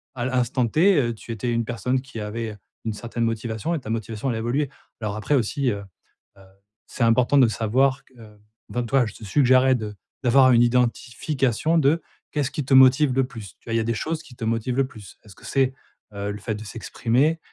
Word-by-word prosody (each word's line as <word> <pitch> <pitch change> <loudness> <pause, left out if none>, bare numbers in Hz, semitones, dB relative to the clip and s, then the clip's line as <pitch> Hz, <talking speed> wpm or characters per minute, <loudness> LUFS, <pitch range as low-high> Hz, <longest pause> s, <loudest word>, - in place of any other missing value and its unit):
à 120 -2 -3
l'instant 125 -1 +1
T 155 - +3
tu 115 - -10
étais 115 +2 -2
une 115 0 0
personne 125 +2 -1
qui 130 -3 -9
avait, 110 +2 -4
heu, - - -14 0.3
une 110 - -1
certaine 115 +2 -3
motivation 115 +5 -2
et - - -2
ta 110 - -9
motivation 115 +2 -3
allait 115 - -1
évoluer. 125 +5 -1 0.3
Alors 105 -2 -3
après 110 +7 0
aussi, 130 +2 0
heu, 100 -1 -5 0.5
heu, - - -17 0.5
c'est 125 - -3
important 120 +4 +3
de 130 - +6
savoir 130 +6 +1
que, - - -27
heu, 105 -2 -15 0.3
ben, 120 - -2
toi, 130 +2 +2
je 105 - -8
te - - -13
suggérerais 130 +3 +4
de 105 -3 -5 0.3
d'avoir 130 +1 +6
une 120 - +5
identification 125 +4 0
de 155 +3 +3 0.3
qu'est-ce 145 -3 -1
qui 150 - -3
te 135 - 0
motive 130 +1 +6
le 135 0 +3
plus? 110 -9 -10
Tu - - -29
vois, - - -2
il - - +2
y - - +2
a - - -1
des 115 +1 -1
choses 160 +7 -3
qui 130 -6 -15
te 115 - -4
motivent 115 +3 -1
le 135 -1 +2
plus. 110 -7 -13
Est-ce 105 -3 -15
que - - -16
c'est, 135 -1 +1 0.4
heu, 100 0 -3
le 105 - -7
fait 110 +1 -3
de 105 - -8
s'exprimer? 125 +8 0
120 Hz, 225 wpm, -24 LUFS, 110-135 Hz, 0.5 s, de